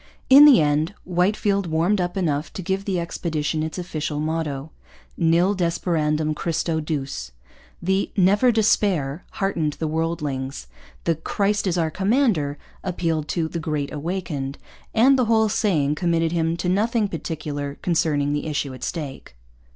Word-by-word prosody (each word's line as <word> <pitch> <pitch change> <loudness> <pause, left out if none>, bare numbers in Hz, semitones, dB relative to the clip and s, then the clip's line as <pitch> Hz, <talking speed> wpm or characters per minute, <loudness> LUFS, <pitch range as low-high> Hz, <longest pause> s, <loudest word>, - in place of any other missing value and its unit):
In 280 +2 +11
the 285 -9 +8
end 155 +5 +1
Whitefield 195 +2 +1
warmed 170 +5 +1
up 175 +2 -2
enough 155 -5 -1
to 190 - -6
give 190 +2 -2
the 190 -3 0
expedition 160 -2 -2
its 160 +2 -4
official 155 -4 -3
motto: 155 -2 -3 0.4
'Nil 170 +4 +3
desperandum 160 -3 0
Christo 165 0 -1
Duce.' 135 - -4 0.5
The 190 +2 +1
'Never 200 +7 +4
Despair' 190 -9 +1
heartened 170 -6 -1
the 160 - -3
worldlings. 150 - -3 0.4
The 165 - +2
'Christ 200 +6 -1
our 160 -2 0
Commander' 190 - +1 0.3
appealed 165 -4 -1
to 165 0 -1
the 170 - -4
'Great 150 -3 -3
Awakened.' 150 -3 -4 0.4
And 260 +4 +5
the 250 - +3
whole 220 -1 +3
saying 175 -10 +1
committed 165 0 +1
him 165 0 0
to 175 - -3
nothing 215 +4 +1
particular 150 -4 -4
concerning 150 -4 +1
the 145 +1 -2
issue 145 -3 -2
at 130 - -10
stake. 140 - -5
165 Hz, 145 wpm, -23 LUFS, 150-190 Hz, 0.5 s, In